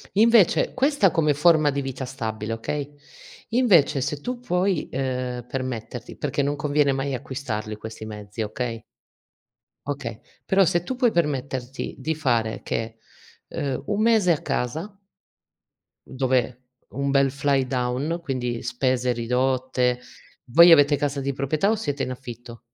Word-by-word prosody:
Invece 225 -2 +4
questa 265 - +3
come 155 -2 +2
forma 155 0 +4
di 140 0 -2
vita 135 -1 -5
stabile, 115 -4 -4
okay, 145 +5 -4 0.5
invece 190 - +4
se 145 +2 -2
tu 250 +5 -4
puoi, 185 -6 0
ehm, 125 -2 -3
permetterti 125 -2 -5
perché - - -1
non 145 +1 0
conviene 145 -1 +2
mai 135 +1 -2
acquistarli 120 -5 -4
questi 110 0 -8
mezzi 105 0 -7
okay 115 +1 -4 1.0
okay, - - -4 0.3
però 195 0 +4
se 175 0 +1
tu 260 - -4
puoi 245 -2 +3
permetterti 135 - -2
di 150 +4 -2
fare 120 -7 0
che 115 0 -4 0.5
uhm, 135 -3 -3
un 205 0 -1
mese 220 -5 +4
a 150 - -3
casa 165 - -3 1.1
dove 130 -2 0 0.3
un 140 +1 -2
bel 140 0 +4
fly 140 -1 +1
down, 130 +6 -1
quindi 125 -6 -3
spese 125 0 0
ridotte 125 +1 0 0.5
voi 170 +5 +8
avete 145 -2 +6
casa 145 0 -2
di 140 0 -2
proprietà 145 +8 0
o 220 - +3
siete 145 -10 -3
in - - -3
affitto? 120 -2 -9
135 Hz, 140 wpm, -24 LUFS, 125-155 Hz, 1.1 s, voi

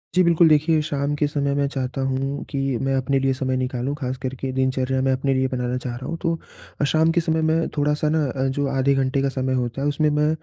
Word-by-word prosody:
जी, 185 - +5
बिल्कुल, 170 -1 +5
देखिए 155 +1 +3
शाम 145 -1 -1
के 145 0 +1
समय 140 -1 -1
मैं 140 0 +1
चाहता 135 -1 -3
हूँ 135 +1 -2
कि 140 - -4 0.2
मैं 135 0 0
अपने 135 +1 +1
लिए 135 0 +1
समय 130 0 -1
निकालूँ 130 +2 -2
ख़ास 130 -3 -4
करके 130 +1 -4
दिनचर्या 130 0 0
में 135 0 +2
अपने 135 +1 +1
लिए 130 0 +1
बनाना 125 -1 -2
चाह 125 -1 -5
रहा 130 +2 -8
हूँ। 165 - -3
तो 165 -3 -4
शाम 160 +1 +3
के 170 +1 +2
समय 160 -1 0
मैं 160 +1 +1
थोड़ा-सा 150 +1 +1
ना 155 0 +2
अ, 130 0 -2
जो 140 +1 -1
आधे 135 0 +2
घंटे 135 0 +1
का 140 - +1
समय 130 -1 -1
होता 125 +1 -2
है 145 - +1
उसमें 150 +1 +2
मैं 150 +1 +2
135 Hz, 240 wpm, -22 LUFS, 130-150 Hz, 0.2 s, जी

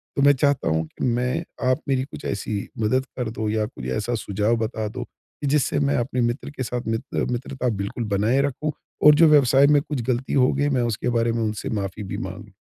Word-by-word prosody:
तो 140 - +1
मैं 145 0 +7
चाहता 140 +1 +1
हूँ 80 0 +1
कि - - -5
मैं 125 +6 0 0.3
आप 130 +5 +1
मेरी 130 -1 +1
कुछ 140 - -10
ऐसी 100 +1 -3 0.2
मदद 130 +4 +1
कर 125 -3 -2
दो, 110 -1 -3
या 110 0 0
कुछ 60 - -9
ऐसा 120 +3 -1
सुझाव 105 +3 +1
बता 110 -1 -3
दो, 125 +3 -5
कि 145 - -10
जिससे 140 0 +2
मैं - - +2
अपने 125 +1 -1
मित्र 120 +4 -1
के 130 - -1
साथ 125 -1 -4
मित्र 115 +4 -2
मित्रता 125 +1 -2
बिल्कुल 100 +4 -3
बनाए 115 +7 +2
रखूँ 150 +3 -3 0.3
और 150 0 +9
जो 165 - +9
व्यवसाय 140 -2 +6
में 145 - +4
कुछ 150 -4 -4
ग़लती 125 +1 -1
होगी 145 +3 +2
मैं 125 - +2
उसके 115 - -2
बारे 115 0 +2
में 115 - 0
उनसे 105 -1 -3
माफ़ी 95 +2 -5
भी - - -2
माँगूँ 100 +2 -10
125 Hz, 220 wpm, -23 LUFS, 110-135 Hz, 0.3 s, और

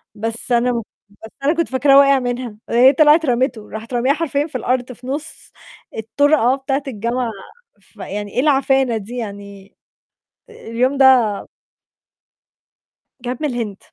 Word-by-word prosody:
بس 225 +3 -3
أنا 240 +1 +2
ما 235 -1 -2
ك - - -16 0.4
بس - - -11
أنا 295 +4 +3
كنت 335 - -1
فاكراه 275 +1 +4
وَاقِع 275 -1 +5
منها، 245 -3 -4
هي 255 +4 +5
طلعِت 310 +2 +5
رمته، 245 -3 -1
راحت 225 +3 -8
رامياها 255 +3 +2
حرفيًا 300 -2 -1
في 260 - -5
الأرض، 250 +1 -2
في 250 +1 -12
نُص 295 +4 -6 0.5
الطرقة 265 +3 +2
بتاعة 275 +1 -3
الجامعة 235 +1 -2 0.5
فيعني 205 0 -8
إيه - - -1
العفانة 270 -4 +2
دي؟ 225 +4 -8
يعني 200 -3 -9 0.8
اليوم 255 - -2
ده 270 - +5 2.2
كانت 250 +3 -5
من - - +2
الهند. 230 -6 -4
250 Hz, 140 wpm, -18 LUFS, 230-275 Hz, 2.2 s, وَاقِع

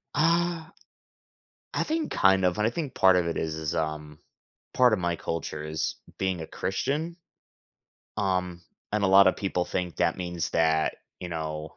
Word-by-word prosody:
Uh 165 +2 +2 1.1
I - - +1
think 315 0 -2
kind 95 -1 +4
of, 90 +1 +1
and 105 +1 +2
I - - +2
think 140 +2 -4
part 95 -1 +5
of 90 -1 +2
it 85 - -2
is, 80 -1 -2
is 80 -1 -3
um 75 -1 -3 0.6
part 125 -3 +5
of 105 - +1
my 85 -1 0
culture 80 -2 -4
is 75 0 -2 0.2
being 95 -2 0
a 80 - -6
Christian. 150 - -2 1.0
Um, 90 -3 -1 0.3
and 105 -1 0
a - - +4
lot 95 0 +7
of 95 - +3
people 90 -3 -1
think 90 -2 -3
that - - +1
means 85 -3 -3
that, 80 -1 +2 0.2
you 90 - -6
know, 80 -1 -5
90 Hz, 175 wpm, -27 LUFS, 80-105 Hz, 1.1 s, lot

